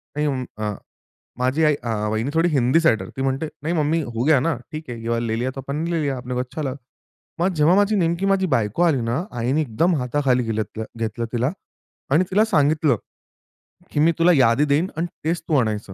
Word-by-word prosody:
नाही 150 Hz, 0 st, 0 dB
अं, 130 Hz, -3 st, -1 dB, 0.2 s
अ, 105 Hz, -, -1 dB, 0.7 s
माझी 130 Hz, +5 st, +1 dB
आई 150 Hz, -1 st, +4 dB
अ, 120 Hz, -, -3 dB, 0.2 s
वहिनी 110 Hz, +5 st, -1 dB
थोडी 165 Hz, +2 st, +3 dB
हिंदी 135 Hz, +1 st, +3 dB
सायडर 140 Hz, -10 st, +2 dB
ती -, -, -2 dB
म्हणते, 135 Hz, +3 st, -1 dB, 0.2 s
"नही 165 Hz, +3 st, -1 dB
मम्मी, 160 Hz, +1 st, +1 dB
हो 120 Hz, -4 st, -3 dB
गया 155 Hz, -2 st, +5 dB
ना 160 Hz, +2 st, 0 dB, 0.2 s
ठीक 155 Hz, -2 st, -7 dB
है, 120 Hz, -2 st, -6 dB
ये 115 Hz, -, -4 dB
वाला 115 Hz, 0 st, 0 dB
ले 110 Hz, 0 st, -1 dB
लिया 130 Hz, +2 st, -1 dB
तो -, -, -6 dB
आपन 140 Hz, +2 st, -5 dB
ने 170 Hz, -, -2 dB
ले 165 Hz, -, 0 dB
लिया. 140 Hz, -3 st, -1 dB
अपने 125 Hz, 0 st, -5 dB
को 125 Hz, -, -1 dB
अच्छा 130 Hz, +5 st, -4 dB
लगा." 130 Hz, -3 st, -2 dB, 0.6 s
मग 185 Hz, +2 st, +1 dB
जेव्हा 155 Hz, +4 st, +4 dB
माझी 205 Hz, +1 st, +3 dB
नेमकी 170 Hz, 0 st, +1 dB
माझी 195 Hz, -1 st, +2 dB
बायको 110 Hz, -, -1 dB
आली 150 Hz, -7 st, +3 dB
ना, 120 Hz, +9 st, -1 dB, 0.2 s
आईनी 130 Hz, +7 st, +1 dB
एकदम 160 Hz, +7 st, +1 dB
हाताखाली 125 Hz, -1 st, +1 dB
घिलत 110 Hz, -1 st, -1 dB
घी 110 Hz, -, -2 dB, 0.2 s
घेतलं 115 Hz, +1 st, -2 dB
तिला 125 Hz, +4 st, +1 dB, 0.6 s
आणि 165 Hz, +5 st, +5 dB
तिला 210 Hz, +3 st, +4 dB
सांगितलं, 150 Hz, -, +2 dB, 0.9 s
की 145 Hz, -, -1 dB
मी 165 Hz, +2 st, +5 dB
तुला 175 Hz, +2 st, +5 dB
यादी 130 Hz, +2 st, +4 dB
देईन 150 Hz, +5 st, +2 dB
आणि 170 Hz, +2 st, 0 dB, 0.2 s
तेच 165 Hz, +1 st, 0 dB
तू 155 Hz, -, +1 dB
आणायचं. 105 Hz, -4 st, -2 dB
140 Hz, 220 wpm, -22 LUFS, 120-165 Hz, 0.9 s, गया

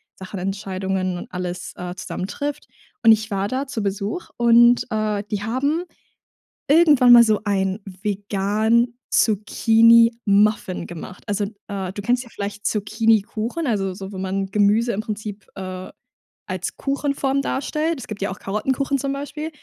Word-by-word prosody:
Sachen 190 Hz, 0 st, -8 dB
Entscheidungen 190 Hz, -1 st, -2 dB
und -, -, -9 dB
alles 180 Hz, 0 st, -5 dB
äh 180 Hz, 0 st, -6 dB
zusammen 185 Hz, 0 st, -5 dB
trifft. 290 Hz, +4 st, -5 dB, 0.4 s
Und 225 Hz, -, +8 dB
ich 220 Hz, 0 st, +2 dB
war 195 Hz, 0 st, 0 dB
da 260 Hz, +5 st, -2 dB
zu 240 Hz, -6 st, -4 dB
Besuch 200 Hz, -, -3 dB
und, 235 Hz, 0 st, +5 dB
äh, 215 Hz, -1 st, -1 dB
die 205 Hz, -1 st, -2 dB
haben 280 Hz, +9 st, 0 dB, 0.9 s
irgendwann 290 Hz, -5 st, +6 dB
mal 240 Hz, -1 st, +10 dB
so 215 Hz, -2 st, +2 dB
ein 195 Hz, -1 st, 0 dB
vegan 205 Hz, +4 st, 0 dB, 0.2 s
Zucchini-Muffin 220 Hz, -3 st, +3 dB
gemacht. 175 Hz, +1 st, -9 dB
Also, 205 Hz, 0 st, 0 dB, 0.2 s
äh, 195 Hz, -3 st, -4 dB
du 205 Hz, -, -5 dB
kennst 245 Hz, +4 st, +1 dB
ja 240 Hz, -, -15 dB
vielleicht 205 Hz, -1 st, -6 dB
Zucchinikuchen, 220 Hz, +6 st, 0 dB
also 195 Hz, -5 st, 0 dB
so, 190 Hz, +1 st, -8 dB
wenn 190 Hz, -, -5 dB
man 195 Hz, +1 st, -1 dB
Gemüse 210 Hz, +4 st, +2 dB
im 205 Hz, -, -2 dB
Prinzip, 210 Hz, -1 st, -6 dB
äh, 185 Hz, -1 st, -7 dB, 0.6 s
als -, -, -4 dB
Kuchenform 275 Hz, -1 st, -1 dB
darstellt. 305 Hz, +3 st, -2 dB
Es -, -, -9 dB
gibt 210 Hz, -2 st, -7 dB
ja 200 Hz, -, 0 dB
auch 190 Hz, -, -6 dB
Karottenkuchen 265 Hz, +7 st, -1 dB
zum 275 Hz, +1 st, -2 dB
Beispiel. 290 Hz, +2 st, -5 dB
215 Hz, 150 wpm, -22 LUFS, 195-240 Hz, 0.9 s, mal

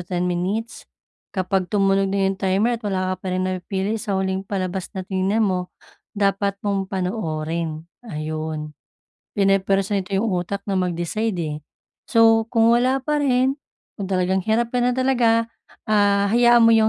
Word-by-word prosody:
10 175 Hz, 0 st, -2 dB
minutes. 185 Hz, +6 st, -3 dB, 0.4 s
Kapag 185 Hz, -1 st, -1 dB
tumunog 195 Hz, 0 st, +2 dB
na 195 Hz, 0 st, 0 dB
'yong 195 Hz, 0 st, -1 dB
timer 205 Hz, +5 st, +1 dB
at -, -, -31 dB
wala 185 Hz, -1 st, -1 dB
ka -, -, 0 dB
pa -, -, -9 dB
ring 185 Hz, -, 0 dB
napipili 190 Hz, +3 st, -2 dB
sa 200 Hz, -1 st, -2 dB
huling 190 Hz, 0 st, -2 dB
palabas 185 Hz, -1 st, -3 dB
na 185 Hz, -, -3 dB
tiningnan 190 Hz, +4 st, +1 dB
mo, 180 Hz, -2 st, -1 dB, 0.5 s
dapat 200 Hz, 0 st, +1 dB
mong 195 Hz, -2 st, -1 dB
panoorin, 165 Hz, -5 st, -3 dB, 0.2 s
ayun. 155 Hz, -5 st, -5 dB, 0.6 s
Pini-press 195 Hz, 0 st, +2 dB
nito 195 Hz, -1 st, -1 dB
'yong 200 Hz, -, +1 dB, 0.2 s
utak 200 Hz, +3 st, -5 dB
na 195 Hz, -2 st, 0 dB
mag-decide, 180 Hz, +4 st, -1 dB
eh. 150 Hz, -1 st, -3 dB, 0.5 s
So 225 Hz, 0 st, +4 dB
kung 230 Hz, -1 st, +4 dB
wala 255 Hz, +2 st, +2 dB
pa 300 Hz, 0 st, +1 dB
rin, 265 Hz, +1 st, +1 dB, 0.4 s
kung 195 Hz, -, -3 dB
talagang 185 Hz, 0 st, +1 dB
hirap 235 Hz, +2 st, +1 dB
ka 250 Hz, -, +1 dB
na 245 Hz, +1 st, +1 dB
talaga, 240 Hz, -3 st, +3 dB, 0.4 s
ah, 205 Hz, -1 st, +3 dB
hayaan 240 Hz, 0 st, +6 dB
mo 230 Hz, -, +6 dB
yung 220 Hz, -1 st, +4 dB
195 Hz, 160 wpm, -22 LUFS, 185-225 Hz, 0.6 s, hayaan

